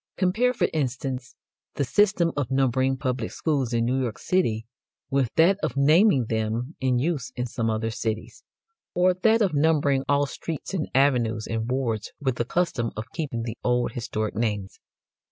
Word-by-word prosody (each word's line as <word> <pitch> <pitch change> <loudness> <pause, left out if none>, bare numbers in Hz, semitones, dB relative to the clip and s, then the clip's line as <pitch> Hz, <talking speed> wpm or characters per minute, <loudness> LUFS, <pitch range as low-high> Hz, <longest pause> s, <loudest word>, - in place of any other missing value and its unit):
Compare, 205 +7 +2
for 250 - +1
instance, 135 -2 -3 0.4
the 140 - 0
system 180 - +2
of 145 -4 -1
numbering 130 0 +1
public 125 -3 -2
schools 140 -7 -1
in 115 -1 +1
New 130 +2 +1
York 120 -4 -3
City 115 -12 0 0.5
with 135 -3 +2
that 185 +5 +4
of 130 - -2
naming 150 - +5
them 110 +6 -2
in 130 -2 +1
use 145 0 -1
in 125 - -2
some 115 -1 -2
other 110 +1 -1
cities; 110 -2 -4 0.5
or 180 +1 +4
that 220 +5 +3
of 190 -6 +1
numbering 145 -2 +2
all 145 0 +3
streets 160 +4 -6
and 175 -5 -2
avenues 120 -5 +2
and 115 +1 -3
wards 120 -5 -2
with 130 -4 -1
the 120 - 0
custom 130 -6 0
of 110 +4 -6
keeping 140 -8 -3
the 115 0 -6
old 125 0 +1
historic 110 -3 -3
names. 105 -4 -2
130 Hz, 170 wpm, -25 LUFS, 115-155 Hz, 0.5 s, naming